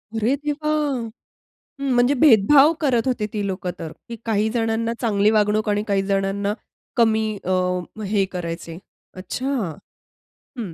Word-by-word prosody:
अरे 225 Hz, +5 st, +1 dB
देवा! 295 Hz, +1 st, -3 dB, 1.1 s
हं 275 Hz, -, 0 dB
म्हणजे 245 Hz, +3 st, +4 dB
भेदभाव 280 Hz, +3 st, +6 dB
करत 260 Hz, -3 st, +1 dB
होते 245 Hz, -4 st, 0 dB
ती 205 Hz, -2 st, -2 dB
लोकं 185 Hz, -2 st, -3 dB
तर, 160 Hz, -, -6 dB, 0.3 s
काही 220 Hz, -1 st, +1 dB
जणांना 230 Hz, 0 st, -1 dB
चांगली 210 Hz, -2 st, +2 dB
वागणूक 215 Hz, 0 st, +2 dB
आणि 205 Hz, 0 st, +1 dB
काही 200 Hz, -1 st, +2 dB
जणांना 195 Hz, +1 st, 0 dB, 0.4 s
कमी 220 Hz, -2 st, +3 dB, 0.2 s
अ, 185 Hz, -, -2 dB, 0.5 s
हे 200 Hz, -1 st, +1 dB
करायचे. 170 Hz, -2 st, -5 dB, 0.4 s
अच्छा. 200 Hz, +8 st, -5 dB, 1.1 s
हं, 200 Hz, -8 st, -5 dB
215 Hz, 130 wpm, -22 LUFS, 200-245 Hz, 1.1 s, भेदभाव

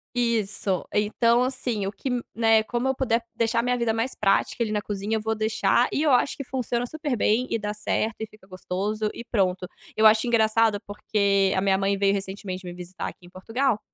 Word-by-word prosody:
Isso, 215 Hz, -5 st, 0 dB
então 230 Hz, +3 st, +3 dB
assim 250 Hz, -5 st, -1 dB
o -, -, -2 dB
que, 210 Hz, +6 st, -5 dB, 0.3 s
né, 225 Hz, -1 st, +4 dB
como 240 Hz, +3 st, -2 dB
eu -, -, +2 dB
puder 235 Hz, -3 st, 0 dB
deixar 230 Hz, 0 st, +1 dB
a -, -, +1 dB
minha 250 Hz, 0 st, +1 dB
vida 235 Hz, -2 st, +1 dB
mais 225 Hz, +4 st, -1 dB
prática 195 Hz, +3 st, +1 dB
ali 230 Hz, -, +1 dB
na 210 Hz, -1 st, -1 dB
cozinha 205 Hz, +1 st, -3 dB
eu 220 Hz, -, -1 dB
vou 220 Hz, +1 st, -1 dB
deixar, 220 Hz, +3 st, +2 dB
e 295 Hz, -, 0 dB
eu 300 Hz, -, +3 dB
acho 255 Hz, +2 st, +3 dB
que 280 Hz, -, -6 dB
funciona 245 Hz, -2 st, -2 dB
super 295 Hz, 0 st, -3 dB
bem, 235 Hz, +3 st, +1 dB
e -, -, 0 dB
dá 210 Hz, -1 st, -3 dB
certo, 215 Hz, +1 st, -1 dB
e 220 Hz, -, -4 dB
fica 215 Hz, -2 st, -20 dB
gostoso, 195 Hz, +3 st, -3 dB
e -, -, -8 dB
pronto. 190 Hz, -6 st, 0 dB, 0.3 s
Eu 220 Hz, -, +3 dB
acho 220 Hz, +2 st, +6 dB
engraçado 220 Hz, -2 st, +3 dB
porque 200 Hz, -1 st, +1 dB
a 190 Hz, -, +1 dB
minha 195 Hz, -1 st, +3 dB
mãe 195 Hz, +1 st, 0 dB
veio 195 Hz, 0 st, +3 dB
recentemente 195 Hz, -1 st, -5 dB
me 175 Hz, -, -6 dB
visitar 180 Hz, +1 st, -6 dB
aqui 180 Hz, -, -10 dB
em -, -, -14 dB
Portugal, 225 Hz, +6 st, -1 dB
220 Hz, 215 wpm, -25 LUFS, 200-235 Hz, 0.3 s, acho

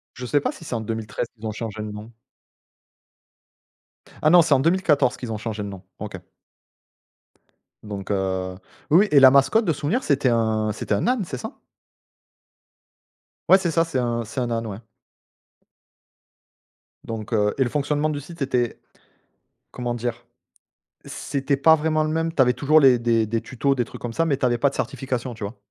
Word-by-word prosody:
Je 125 Hz, -, -7 dB
sais 145 Hz, +4 st, +2 dB
pas -, -, -2 dB
si -, -, -13 dB
c'est 140 Hz, -, -4 dB
en 115 Hz, -, -1 dB
2013 110 Hz, +1 st, -4 dB
qu'ils 110 Hz, 0 st, -11 dB
ont 110 Hz, -, -2 dB
changé 110 Hz, 0 st, -6 dB
le 105 Hz, -, -5 dB
nom. 105 Hz, +2 st, -9 dB, 2.1 s
Ah 155 Hz, -, +4 dB
non, 175 Hz, +1 st, +8 dB
c'est 155 Hz, -3 st, +2 dB
en 130 Hz, -, +4 dB
2014 160 Hz, -5 st, +2 dB
qu'ils 120 Hz, -3 st, -6 dB
ont 110 Hz, -, -3 dB
changé 110 Hz, -1 st, -5 dB
le 100 Hz, -, -5 dB
nom. 95 Hz, -1 st, -10 dB, 0.2 s
OK. 105 Hz, -2 st, -6 dB, 1.7 s
Donc 100 Hz, -2 st, -7 dB
heu, 95 Hz, -1 st, -2 dB, 0.3 s
oui, 165 Hz, +5 st, +6 dB
oui, 210 Hz, -, +2 dB
et 145 Hz, -, +7 dB
la 130 Hz, -1 st, +8 dB
mascotte 140 Hz, +12 st, +4 dB
de 165 Hz, -, +2 dB
souvenir, 155 Hz, -, -1 dB
c'était 140 Hz, -2 st, +2 dB
un 110 Hz, -2 st, +1 dB
c'était 105 Hz, -, -3 dB
un -, -, -1 dB
âne, 250 Hz, -5 st, +1 dB
c'est 135 Hz, -6 st, -6 dB
ça? -, -, -7 dB, 1.9 s
Ouais, 190 Hz, -, +9 dB
c'est 175 Hz, -, -1 dB
ça, 165 Hz, +1 st, +3 dB
c'est 160 Hz, -6 st, -2 dB
un 120 Hz, -1 st, -1 dB
c'est 110 Hz, +5 st, -6 dB
un 120 Hz, -1 st, -1 dB
âne, 115 Hz, 0 st, -2 dB
ouais. 100 Hz, -1 st, -6 dB, 2.3 s
Donc 115 Hz, 0 st, -6 dB
heu 105 Hz, -1 st, +2 dB
et 135 Hz, -, +3 dB
le 125 Hz, -, -2 dB
fonctionnement 150 Hz, +3 st, 0 dB
du 145 Hz, -, -3 dB
site 165 Hz, +3 st, -12 dB
était 125 Hz, -3 st, -1 dB, 0.9 s
comment 120 Hz, -1 st, -3 dB
dire? 120 Hz, 0 st, -4 dB, 0.8 s
C'était 140 Hz, 0 st, -2 dB
pas 160 Hz, +4 st, +6 dB
vraiment 155 Hz, 0 st, +1 dB
le 155 Hz, -, -1 dB
même, 165 Hz, +1 st, -1 dB
tu 150 Hz, -, -1 dB
avais 125 Hz, -1 st, +5 dB
toujours 145 Hz, +5 st, +3 dB
les 130 Hz, -3 st, +6 dB
des 115 Hz, -2 st, +1 dB
des 115 Hz, +1 st, -1 dB
tutos, 135 Hz, +3 st, -1 dB
des 120 Hz, -2 st, 0 dB
trucs -, -, -12 dB
comme 120 Hz, -1 st, -5 dB
ça, 165 Hz, -, +1 dB
mais 145 Hz, -4 st, +1 dB
tu 130 Hz, -, 0 dB
avais 120 Hz, -1 st, +1 dB
pas 140 Hz, +3 st, +3 dB
de -, -, -13 dB
certification, 130 Hz, -2 st, -3 dB
tu 110 Hz, -, -12 dB
vois? 100 Hz, +4 st, -6 dB
125 Hz, 190 wpm, -23 LUFS, 110-145 Hz, 2.3 s, Ouais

